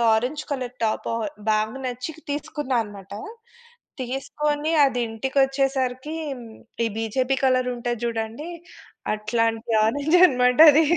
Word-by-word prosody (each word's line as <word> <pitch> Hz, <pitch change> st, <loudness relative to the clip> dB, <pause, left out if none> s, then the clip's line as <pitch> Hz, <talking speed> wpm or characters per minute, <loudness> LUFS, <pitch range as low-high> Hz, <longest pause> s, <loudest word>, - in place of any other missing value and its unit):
Orange 255 Hz, +7 st, -1 dB
colour 250 Hz, -3 st, -3 dB
top 215 Hz, -, -1 dB
ఆహ్, 225 Hz, -2 st, -2 dB, 0.2 s
బాగా 215 Hz, +3 st, 0 dB
నచ్చి 250 Hz, +5 st, -4 dB, 0.2 s
తీసుకున్నానమాట. 235 Hz, -, -3 dB, 0.9 s
తీసుకొని, 290 Hz, +4 st, -2 dB
అది 255 Hz, -2 st, 0 dB
ఇంటికి 245 Hz, +5 st, -4 dB
వచ్చేసరికి 270 Hz, +1 st, -1 dB, 0.7 s
ఈ -, -, +2 dB
బీజేపీ 250 Hz, +4 st, 0 dB
కలర్ 255 Hz, -1 st, +3 dB
ఉంటది 240 Hz, -1 st, -3 dB
చూడండి. 230 Hz, +6 st, -3 dB, 0.6 s
అట్లాంటి 225 Hz, +2 st, -1 dB
ఆరంజ్ 285 Hz, +9 st, +2 dB
అన్నమాట 250 Hz, -3 st, +3 dB
అది. 310 Hz, +3 st, +5 dB
250 Hz, 110 wpm, -24 LUFS, 225-275 Hz, 0.9 s, అది